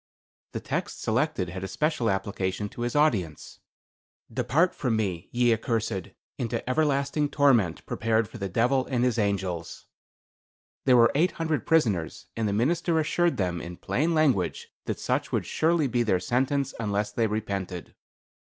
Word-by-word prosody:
The - - -2
text - - -4
selected 90 - 0
had 95 +2 -6
a - - -2
special 150 - 0
application 95 0 -2
to 120 - -9
his 120 +2 -2
audience: 105 - 0 0.7
'Depart 165 +8 +2
from 125 -5 -1
me 95 -6 -2
ye 120 -1 +3
accursed, 110 -5 -2 0.3
into 120 0 -3
everlasting 145 +1 +1
torment 120 - +2
prepared 110 0 0
for 120 - -11
the 100 -1 -3
Devil 125 +7 +1
and 125 -3 0
his 125 -2 +1
angels.' 95 -5 -2 1.0
There 130 -2 +6
were 115 0 +6
eight 170 +6 +2
hundred 160 -7 -2
prisoners, 105 - +1
and 115 -1 0
the - - 0
minister 165 - +1
assured 170 +2 +1
them, 90 -3 -1
in 85 0 -8
plain 150 - 0
language, 135 - +1 0.2
that - - -2
such - - -1
would - - 0
surely 165 -1 +1
be 120 -2 +1
their 105 -6 +2
sentence 135 +7 0
unless 105 -2 -1
they 115 -1 +1
repented." 100 -4 -4
115 Hz, 155 wpm, -27 LUFS, 100-140 Hz, 1.0 s, There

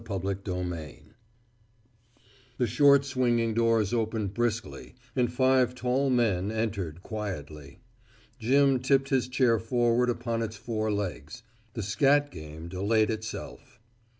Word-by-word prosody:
II 100 - -1
ONE 95 +1 -3 0.3
FLESH 80 -4 -7 1.6
The 125 - +2
short 140 +2 +5
swinging 120 -4 +1
doors 115 -2 +2
opened 110 -3 -1
briskly 115 0 -3 0.2
and 125 -3 +1
five 130 -1 +2
tall 130 +2 0
men 110 -6 +1
entered 100 -7 -3
quietly. 75 - -7 0.6
Jim 135 +3 +3
tipped 135 +1 +2
his 130 -3 +1
chair 125 -3 +2
forward 120 +1 +1
upon 115 -1 -2
its 110 -1 -4
four 110 -1 -2
legs. 100 - -4 0.3
The 110 - -3
scat 145 +7 +2
game 80 0 -9
delayed 105 +5 +1
itself. 115 +3 -7
115 Hz, 125 wpm, -28 LUFS, 100-125 Hz, 1.6 s, short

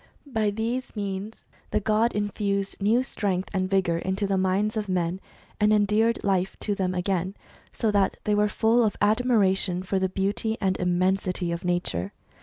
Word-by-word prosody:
By 220 -6 0
these 230 +5 -3
means 200 +1 -5 0.2
the - - +1
god 215 +3 +2
infused 200 -1 -2
new 225 +5 +3
strength 195 -7 -2
and 185 -1 0
vigour 185 -4 +1
into 190 +3 -1
the 195 0 0
minds 190 +3 +1
of 210 -2 -2
men, 180 0 -1 0.4
and 210 0 +4
endeared 215 +2 +2
life 190 -2 0
to 210 - 0
them 185 -2 -1
again, 185 +1 -1 0.4
so 220 - 0
that 200 -2 +2
they 210 - +1
were 210 0 +3
full 230 +3 +3
of 215 - 0
admiration 205 -5 +2
for 190 +1 -1
the 190 0 0
beauty 200 +4 -1
and 190 -2 +1
immensity 180 0 0
of 170 0 -4
nature. 175 - -1
200 Hz, 170 wpm, -26 LUFS, 185-215 Hz, 0.4 s, and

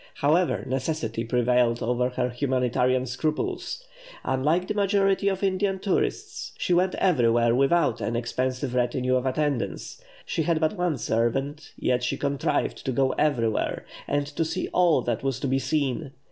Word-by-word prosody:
However, 165 +5 +2
necessity 130 -4 -2
prevailed 120 0 +2
over 125 +1 +1
her 125 0 -1
humanitarian 125 0 +1
scruples. 155 - -3 0.4
Unlike 150 +8 +1
the - - -1
majority 200 -1 +2
of 195 0 0
Indian 195 0 +1
tourists, 195 0 -2
she 180 - 0
went 180 +1 +2
everywhere 120 -9 +3
without 135 -2 +2
an 115 - -2
expensive 130 +2 -2
retinue 125 +1 +1
of 130 +1 0
attendants; 145 - -2 0.2
she 165 - -1
had 160 0 +1
but 160 +4 +1
one 175 -5 0
servant, 135 +7 -1
yet 125 -1 +1
she 125 - -1
contrived 140 -1 -1
to 130 - -1
go 130 +1 +2
everywhere, 120 -8 0 0.2
and 145 0 0
to 145 +3 -2
see 160 0 -3
all 170 -8 +3
that 120 -2 -1
was 135 -2 -2
to 140 - -1
be 135 +1 +1
seen. 135 +1 -1
135 Hz, 155 wpm, -26 LUFS, 125-160 Hz, 0.4 s, everywhere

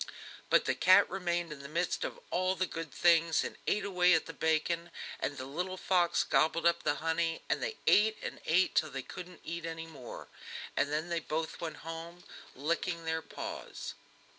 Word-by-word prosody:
But - - +5
the - - +2
cat 185 - +6
remained 175 -3 -1
in 145 - -11
the 140 0 -9
midst 170 +3 0
of - - -4
all 185 +1 +1
the 185 - +1
good 165 -4 -6
things 165 -2 +4
and - - -5
ate 205 -1 +1
away 180 -3 +5
at 160 - +1
the - - -7
bacon, 165 +2 0 0.3
and 145 - -2
the 130 - -5
little 180 +7 -3
fox 175 -2 +2
gobbled 165 +1 +2
up 170 - +4
the 145 - +1
honey, 165 +1 0
and - - 0
they 470 -3 -2
ate 215 +1 +5
and - - -5
ate 175 +4 +4
till 155 - +2
they 135 -2 -5
couldn't 180 +5 -9
eat 170 0 -4
any 165 0 -4
more, 140 -7 -9 0.5
and 145 0 +1
then 155 +3 -1
they 170 -1 0
both 160 0 -3
went 165 -2 -4
home 165 +2 -7 0.3
licking 165 +4 -1
their 160 0 0
paws. - - -6
165 Hz, 190 wpm, -32 LUFS, 160-180 Hz, 0.5 s, cat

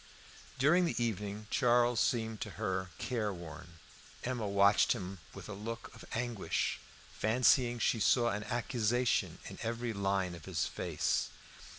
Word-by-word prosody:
During 165 +7 +4
the - - -1
evening 105 -1 -3
Charles 120 -2 +3
seemed 110 -3 0
to 105 - -3
her 95 0 -1
careworn. 85 -8 -4 0.5
Emma 120 -4 -2
watched 100 +1 +5
him 95 0 -6 0.2
with - - -9
a 105 - -6
look 115 +3 -6
of - - -12
anguish, 120 -3 -1 0.3
fancying 120 +2 +3
she 115 0 +1
saw 120 +3 +4
an 105 0 -2
accusation 120 0 0
in - - -8
every 115 0 -2
line 95 -2 0
of 85 -3 -10
his - - -1
face. - - -1
110 Hz, 135 wpm, -33 LUFS, 100-120 Hz, 0.5 s, watched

